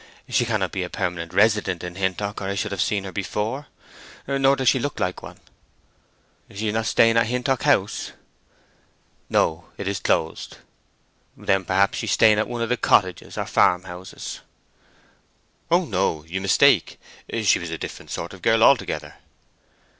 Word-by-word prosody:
She - - +1
cannot - - -1
be - - -3
a - - -4
permanent 85 -1 -3
resident 100 -2 +2
in 90 0 -5
Hintock 95 +2 -2
or - - -4
I 100 - -2
should 100 +1 -2
have 100 -4 -2
seen 100 +4 0
her 95 - -7
before. 105 +9 -3 0.6
Nor 135 0 +3
does 130 -2 -2
she 130 - +5
look 145 +3 -4
like 90 0 -2
one." - - -11 1.1
"She 105 +2 -3
is - - -2
not 110 0 -1
staying 115 0 +4
at 115 -1 +3
Hintock 125 +2 -1
House?" 120 -9 +1 1.2
"No; 80 +1 +1
it 100 - -5
is 100 -2 -1
closed." 80 - -1 0.8
"Then 95 -1 0
perhaps 100 +2 +1
she 110 - -4
is 95 - +1
staying 110 -2 +5
at 110 - 0
one 120 -1 -3
of 115 - -3
the 125 - +1
cottages, 90 -7 +1
or - - -2
farmhouses?" 90 0 -1 1.3
"Oh 175 +2 +3
no—you 90 - -2
mistake. 95 -1 +3 0.4
She - - +4
was - - -6
a - - -4
different - - -8
sort 85 - -5
of 95 - -12
girl 115 +3 +3
altogether." 75 - +2
100 Hz, 165 wpm, -23 LUFS, 90-115 Hz, 1.3 s, she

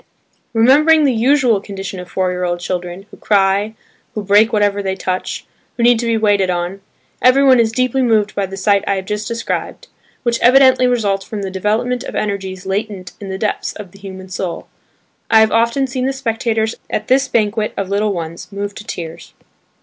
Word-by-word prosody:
Remembering 295 +7 +5
the 275 -3 +3
usual 240 -2 +3
condition 195 -2 -7
of 180 0 -9
four 185 -1 0
year 180 0 -3
old 175 -1 -1
children, 180 +1 -5
who - - -13
cry, 200 +1 +1 0.4
who 210 - -3
break 205 +3 +4
whatever 205 -2 +1
they 190 -1 -2
touch, 185 -1 -3 0.3
who 235 - 0
need 240 -1 +5
to 235 - -2
be 230 -1 +2
waited 205 -3 +2
on, 180 +2 -2 0.4
everyone 260 0 +5
is 225 -1 +3
deeply 255 +3 0
moved 220 -4 +2
by 200 -1 -1
the 195 +1 -8
sight 200 0 +2
I 200 - +2
have 190 -1 -4
just 210 +1 -3
described, 230 0 -4 0.3
which 240 -1 0
evidently 260 0 +6
results 205 -6 0
from 205 +1 -6
the 190 - -4
development 215 +6 -1
of - - -7
energies 190 -2 -3
latent 195 -2 -3
in 200 - -7
the 190 - -4
depths 210 +2 -2
of 205 -4 -10
the 195 - -16
human 190 -1 -9
soul. 180 -1 -4 0.6
I 220 - +6
have 220 -1 +3
often 235 +4 +2
seen 260 0 -2
the 270 - -1
spectators 225 -3 -1 0.2
at 215 - -3
this 270 +2 +3
banquet 215 -2 0
of 195 -1 -2
little 205 +1 +1
ones, 170 0 -6
moved 200 0 -5
to - - -8
tears. 165 -5 -8
210 Hz, 195 wpm, -17 LUFS, 190-235 Hz, 0.6 s, evidently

